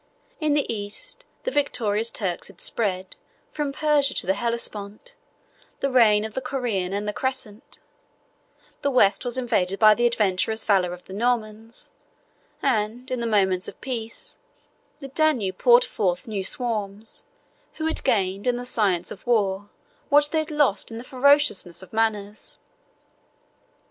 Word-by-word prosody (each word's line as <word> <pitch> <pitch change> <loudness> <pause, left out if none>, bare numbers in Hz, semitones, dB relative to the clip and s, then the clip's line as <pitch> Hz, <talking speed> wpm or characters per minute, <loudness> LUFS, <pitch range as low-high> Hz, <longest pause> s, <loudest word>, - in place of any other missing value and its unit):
In 305 -2 +1
the 290 - +2
East, 355 - -6 0.2
the - - -2
victorious 230 - 0
Turks 185 -7 -3
had 195 -3 -16
spread, 190 -4 -2 0.4
from 295 -2 -2
Persia 290 -2 +2
to - - 0
the 190 - +2
Hellespont, 230 - -4 0.7
the 275 - -1
reign 215 -4 +5
of 220 - -7
the 260 - -3
Koran 245 -8 -2
and 205 +1 -3
the 210 - -1
Crescent: 260 -1 -4 1.0
the 280 - +1
West 205 -7 +3
was 245 0 -3
invaded 195 -7 0
by 215 0 +7
the 240 +2 +2
adventurous 220 -1 +1
valor 190 -4 +2
of 180 0 -9
the 190 - -10
Normans; 225 0 -2 0.7
and, 245 0 -1
in 255 - -1
the 235 - -2
moments 190 -4 +2
of - - -10
peace, 230 -3 -6 0.6
the 275 - -6
Danube 260 - +1
poured 245 0 +6
forth 180 -2 -1
new 205 -3 -3
swarms, 215 -2 -1 0.5
who 315 - -4
had 320 - 0
gained, 195 +1 0
in 245 -1 +2
the 245 - -6
science 195 -8 +1
of 205 - -11
war, 205 -4 +1 0.4
what 290 0 +5
they 320 - +2
had 315 +1 -3
lost 290 -9 +1
in 225 - -7
the 235 - -7
ferociousness 255 - +2
of 190 - -15
manners. 215 -2 -2
225 Hz, 155 wpm, -24 LUFS, 200-260 Hz, 1.0 s, by